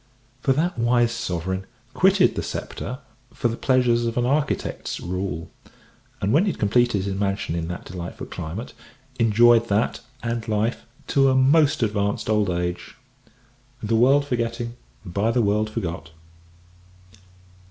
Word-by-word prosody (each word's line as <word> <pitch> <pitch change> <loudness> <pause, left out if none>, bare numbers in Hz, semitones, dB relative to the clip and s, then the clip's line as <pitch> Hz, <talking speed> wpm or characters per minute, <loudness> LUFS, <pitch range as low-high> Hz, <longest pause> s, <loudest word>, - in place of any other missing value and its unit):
For 135 - +2
that 160 0 -1
wise 120 0 +3
Sovereign 95 -4 -3 0.3
quitted 190 0 +4
the - - -3
sceptre 125 - -5 0.3
for 120 - -1
the 115 - -3
pleasures 120 -2 +2
of 115 - -3
an 120 - +2
architect's 145 +3 -1
rule; 90 -2 -4 0.7
and, 100 - 0
when 165 +8 +4
he - - +1
had - - -14
completed 110 -1 +2
his 100 - -2
mansion 100 -3 -1
in 80 -1 -2
that 90 +1 -6
delightful 90 -1 -7
climate, 90 +10 -6 0.5
enjoyed 115 +1 +5
that, 105 +2 0 0.2
and 115 -1 -3
life, 110 +2 -1 0.2
to 135 -1 +4
a 130 - +2
most 140 +1 +4
advanced 105 0 -1
old 105 -2 +2
age 90 0 -3 0.9
"The 110 +2 +1
world 135 +5 +4
forgetting, 115 -2 -2 0.3
by 100 +5 0
the 120 0 +2
world 105 +1 +1
forgot." 85 -9 -4
115 Hz, 140 wpm, -23 LUFS, 100-125 Hz, 0.9 s, enjoyed